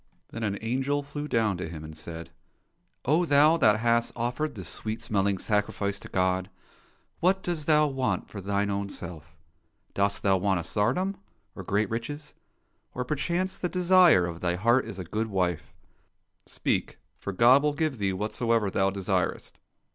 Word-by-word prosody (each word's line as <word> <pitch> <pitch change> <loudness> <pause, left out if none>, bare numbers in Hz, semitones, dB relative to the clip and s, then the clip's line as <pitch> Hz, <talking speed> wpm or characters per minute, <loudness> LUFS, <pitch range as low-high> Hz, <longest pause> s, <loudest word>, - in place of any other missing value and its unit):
Then 115 - -6
an 100 -2 -1
angel 135 +5 0
flew 145 +1 -6
down 110 -7 +1
to 90 -2 -5
him, 80 -2 -8
and 80 0 -9
said, 80 +1 -8 0.4
" 170 +1 -47
Oh, 155 +7 +3
thou 150 0 +5
that 110 -8 +4
hast 115 0 +2
offered 125 +5 -2
this 95 -5 -8
sweet 110 +3 -4
smelling 100 -1 0
sacrifice 100 -1 -1
to - - -10
God, 95 0 0 0.7
what 190 +2 +2
dost 165 -4 -3
thou 150 -1 +5
want 135 -3 -1
for 100 - -8
thine 100 +1 0
own 100 0 -2
self? 85 -3 -9 0.6
Dost 100 0 0
thou 95 -1 +4
want 95 -1 +1
a - - -4
tsardom, 130 - 0 0.4
or - - -6
great 100 +3 0
riches? 145 +6 -5 0.6
Or, 125 - -2
perchance, 175 +7 -1
the 180 - -1
desire 180 - +5
of 85 -1 -5
thy 90 0 0
heart 120 +7 +3
is 110 -4 -8
a 95 - -4
good 105 +6 -2
wife? 90 -5 -1 0.8
Speak, - - -2 0.2
for 100 - -4
God 120 +7 +6
will 150 0 +1
give 150 -5 -1
thee 100 -1 +1
whatsoever 105 +2 0
thou 95 +1 +2
desirest." 95 -2 -2
110 Hz, 170 wpm, -27 LUFS, 95-145 Hz, 0.8 s, God